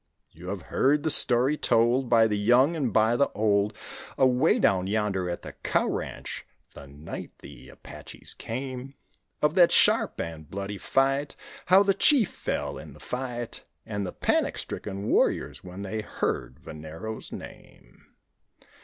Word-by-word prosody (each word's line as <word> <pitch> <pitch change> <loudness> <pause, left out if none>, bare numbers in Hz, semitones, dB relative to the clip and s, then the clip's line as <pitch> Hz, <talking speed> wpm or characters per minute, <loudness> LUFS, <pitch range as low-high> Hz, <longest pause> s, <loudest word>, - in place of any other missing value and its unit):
You 85 +3 -12
have 95 -1 -4
heard 145 +2 +3
the 155 - +1
story 130 +4 +3
told 120 +1 +2
By 115 -2 +5
the 105 -1 +1
young 125 +10 +4
and 135 -7 -1
by 110 +3 +3
the 140 +3 +2
old, 105 0 +1 0.4
Away 130 -1 +4
down 95 -1 +2
yonder 100 -3 -1
at 85 - -5
the - - -8
cow - - 0
ranch - - -5 0.3
the 70 - -11
night 75 +4 -9
the - - -13
Apaches - - -11
came; 130 +2 -6 0.5
Of 150 0 +3
that 175 -2 +6
sharp - - +3
and 80 -2 -6
bloody 100 +1 -5
fight, 135 +2 +1 0.3
How 190 +2 +7
the 200 -1 +3
chief 230 - +4
fell - - -3
in - - -11
the - - -16
fight 125 -2 -5 0.2
And 105 -2 -3
the 90 - -4
panic - - 0
stricken 100 -1 -5
warriors - - +1
when 90 +2 -8
they 110 +2 -3
heard 65 - -3
Venero's 80 +8 -8
name. - - -13
110 Hz, 155 wpm, -27 LUFS, 95-135 Hz, 0.5 s, How